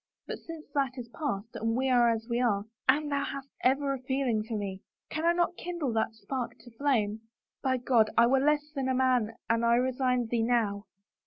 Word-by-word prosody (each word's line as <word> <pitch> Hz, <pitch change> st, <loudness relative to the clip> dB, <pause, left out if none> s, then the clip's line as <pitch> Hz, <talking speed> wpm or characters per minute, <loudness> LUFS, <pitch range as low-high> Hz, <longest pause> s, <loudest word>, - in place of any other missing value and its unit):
But -, -, -5 dB
since 330 Hz, -2 st, -9 dB
that 275 Hz, -2 st, 0 dB
is 240 Hz, -2 st, -7 dB
past 235 Hz, -6 st, -4 dB
and 225 Hz, +1 st, 0 dB
we 265 Hz, +1 st, +1 dB
are 245 Hz, -2 st, +5 dB
as 225 Hz, -1 st, -1 dB
we 240 Hz, 0 st, 0 dB
are 205 Hz, -5 st, +1 dB
— -, -, -14 dB
Anne, 295 Hz, +2 st, +4 dB
thou 280 Hz, -1 st, 0 dB
hast 275 Hz, 0 st, -5 dB
ever 275 Hz, +2 st, +2 dB
a 270 Hz, -, -4 dB
feeling 260 Hz, -3 st, 0 dB
for 220 Hz, 0 st, -4 dB
me. 195 Hz, -2 st, -4 dB, 0.3 s
Can 315 Hz, +2 st, -2 dB
I -, -, +6 dB
not 345 Hz, 0 st, +1 dB
kindle 340 Hz, -8 st, -3 dB
that 225 Hz, 0 st, 0 dB
spark 245 Hz, +1 st, -4 dB
to 240 Hz, -, -14 dB
flame? 225 Hz, -4 st, 0 dB, 0.4 s
By 260 Hz, -1 st, +1 dB
God, 240 Hz, -3 st, +3 dB
I 235 Hz, -, +7 dB
were 265 Hz, +3 st, +4 dB
less 295 Hz, +1 st, +1 dB
than 270 Hz, -3 st, -2 dB
a 260 Hz, -, +1 dB
man 250 Hz, -4 st, +2 dB
an 230 Hz, 0 st, +2 dB
I 235 Hz, 0 st, +4 dB
resigned 250 Hz, -1 st, +1 dB
thee 235 Hz, -1 st, +2 dB
now! 225 Hz, -3 st, +1 dB
250 Hz, 220 wpm, -29 LUFS, 230-275 Hz, 0.4 s, I